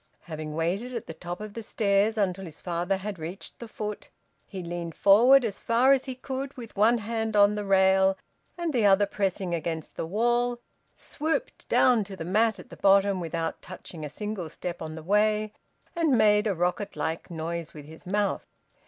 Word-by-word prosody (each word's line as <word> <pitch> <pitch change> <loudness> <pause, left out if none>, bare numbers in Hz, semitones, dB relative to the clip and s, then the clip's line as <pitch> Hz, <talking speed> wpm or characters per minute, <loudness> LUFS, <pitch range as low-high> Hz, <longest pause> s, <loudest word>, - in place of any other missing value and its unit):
Having 155 -2 -6
waited 195 +10 -2
at 230 - -4
the - - -7
top 175 +2 -7
of 215 -1 -7
the 230 - -6
stairs 210 0 +1
until 195 -2 0
his 160 -3 -11
father 175 +2 -1
had 195 -1 -6
reached 170 +5 -8
the 235 - -7
foot, 210 -1 -6 0.4
he 190 -3 -7
leaned 170 -1 -5
forward 240 +6 +6
as 205 -3 -4
far 240 +4 +3
as 270 -1 +3
he 260 -2 -5
could 265 +2 -5
with 235 -3 -9
one 220 +4 +4
hand 225 0 -3
on 205 0 +6
the 210 0 -3
rail 190 0 +4 0.4
and 340 -3 -2
the 240 -4 +2
other 200 0 +5
pressing 195 -3 -2
against 160 -1 -4
the - - -3
wall, 240 +5 +1 0.4
swooped 320 +10 -4
down 240 -4 +4
to 195 0 -9
the 165 - -6
mat 220 +5 +2
at - - -13
the - - -10
bottom, 195 0 +4
without 165 -1 -3
touching 175 -3 -9
a 150 - -4
single 205 0 -5
step 175 +2 -6
on 155 0 -6
the 160 - -8
way, 210 +3 +2 0.4
and 320 -7 +2
made 210 0 +4
a 200 - 0
rocket 180 +4 -1
like 160 +1 -3
noise 165 -1 -5
with 150 -2 -9
his 160 +2 -13
mouth. 205 +1 -1
200 Hz, 195 wpm, -27 LUFS, 175-225 Hz, 0.4 s, forward